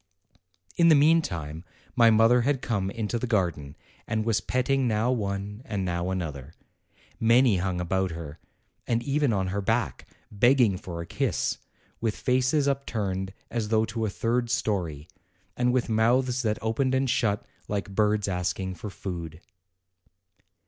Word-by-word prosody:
In 170 - +5
the 160 - +7
meantime, 90 - +2 0.3
my 115 -2 +6
mother 115 +3 +5
had 135 +1 0
come 100 -5 -1
into 110 +2 -3
the 125 - -3
garden 85 - -1 0.3
and 110 0 -1
was 110 -2 +1
petting 130 +3 +1
now 110 +2 +1
one 100 -2 -3
and 105 -6 -3
now 85 0 -2
another. 80 -6 -5 0.6
Many 115 -1 +4
hung 90 0 -1
about 95 +2 0
her, 80 -2 -8 0.5
and 120 0 0
even 140 0 +1
on 95 -3 0
her 100 +2 -2
back, 110 +2 -1 0.2
begging 120 0 +4
for 85 -4 -6
a - - -6
kiss, - - -1 0.4
with 110 -2 -1
faces 130 +3 +1
upturned 100 -9 -2 0.2
as 115 -3 -2
though 110 0 +2
to 110 +1 -4
a - - -2
third 120 +3 -1
story, 90 - -2 0.5
and 125 0 +2
with 125 -1 +1
mouths 120 +3 +2
that 110 -3 0
opened 130 +4 +1
and 135 +1 +1
shut 115 -5 0 0.2
like 100 -1 -2
birds 105 0 +2
asking 90 0 -2
for 100 +4 -7
food. 85 -5 -6
110 Hz, 150 wpm, -27 LUFS, 95-125 Hz, 0.6 s, the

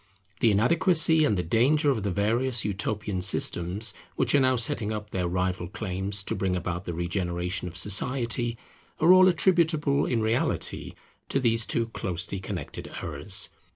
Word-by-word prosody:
The 115 - +3
inadequacy 160 - +4
and 105 -8 +1
the 90 - -1
danger 140 - +2
of 115 -5 -2
the 100 - -2
various 115 +5 0
utopian 105 -1 -3
systems 95 +1 +2 0.2
which - - 0
are 145 - +5
now 130 -1 +3
setting 115 -2 +1
up 105 -1 -6
their 90 -2 -2
rival 90 0 -2
claims 100 0 -4
to - - -3
bring 95 -1 -1
about 90 +1 -4
the 85 - -4
regeneration 90 +1 -3
of 85 0 -7
society, 120 +4 0 0.4
are 170 +4 +6
all 185 0 +7
attributable 165 -5 +2
in 115 -3 0
reality 110 +2 -2 0.4
to 135 - +1
these 115 -3 +1
two 115 - 0
closely 90 -2 -4
connected 95 - -7
errors. 80 +6 -1
105 Hz, 155 wpm, -26 LUFS, 95-130 Hz, 0.4 s, all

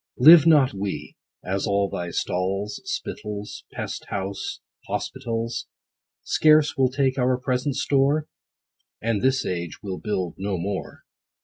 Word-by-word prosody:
Live 155 +4 +9
not 145 -6 +5
we, 95 -6 -4 0.3
as 95 +3 -1
all 100 0 +2
thy 85 -2 -4
stalls, 95 +4 -2
Spittles, 105 0 -5
pest - - -5
house, 100 0 -4 0.3
hospitals, 115 0 -3 0.6
Scarce 155 -1 +4
will 130 -2 +3
take 130 0 0
our 125 0 +2
present 130 +2 -1
store? 145 +3 +2 0.7
And 115 -2 0
this 130 0 +2
age 85 0 -4
will 95 -2 -4
build 95 -6 -3
no 100 -1 -2
more. 95 +3 -4
105 Hz, 125 wpm, -24 LUFS, 95-130 Hz, 0.7 s, Live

